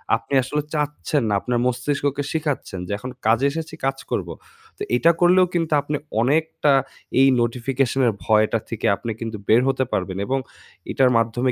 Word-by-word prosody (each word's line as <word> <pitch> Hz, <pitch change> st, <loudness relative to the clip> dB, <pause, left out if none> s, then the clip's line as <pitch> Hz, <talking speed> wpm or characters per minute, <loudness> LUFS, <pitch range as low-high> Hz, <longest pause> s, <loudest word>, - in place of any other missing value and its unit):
আপনি 115 Hz, +4 st, -7 dB
আসলে 150 Hz, +3 st, -2 dB
চাচ্ছেন 150 Hz, -1 st, -1 dB
না। -, -, +1 dB
আপনার 120 Hz, -1 st, -1 dB
মস্তিষ্ককে 140 Hz, +3 st, -1 dB
শিখাচ্ছেন 145 Hz, -, -3 dB
যে -, -, -6 dB
এখন 125 Hz, +5 st, -7 dB, 0.2 s
কাজে 115 Hz, +5 st, +3 dB
এসেছি 160 Hz, 0 st, -6 dB
কাজ 135 Hz, 0 st, 0 dB
করব। -, -, -1 dB, 0.5 s
তো -, -, -20 dB
এটা 165 Hz, +7 st, +5 dB
করলেও 180 Hz, +1 st, +5 dB
কিন্তু 165 Hz, -2 st, 0 dB
আপনি 150 Hz, +1 st, -3 dB, 0.3 s
অনেকটা 150 Hz, +2 st, +1 dB, 0.5 s
এই 135 Hz, -, +7 dB
notification 125 Hz, +2 st, -1 dB
এর 110 Hz, -, +2 dB
ভয়টা 110 Hz, +1 st, +3 dB
থেকে 115 Hz, -, -4 dB
আপনি 115 Hz, +2 st, -5 dB
কিন্তু 115 Hz, -2 st, -5 dB
বের 115 Hz, +3 st, +5 dB
হতে 130 Hz, 0 st, +1 dB
পারবেন 95 Hz, 0 st, -2 dB
এবং 135 Hz, +1 st, 0 dB, 0.5 s
এটার 130 Hz, -1 st, +3 dB
মাধ্যমে 120 Hz, +3 st, +1 dB
135 Hz, 165 wpm, -22 LUFS, 115-150 Hz, 0.5 s, এই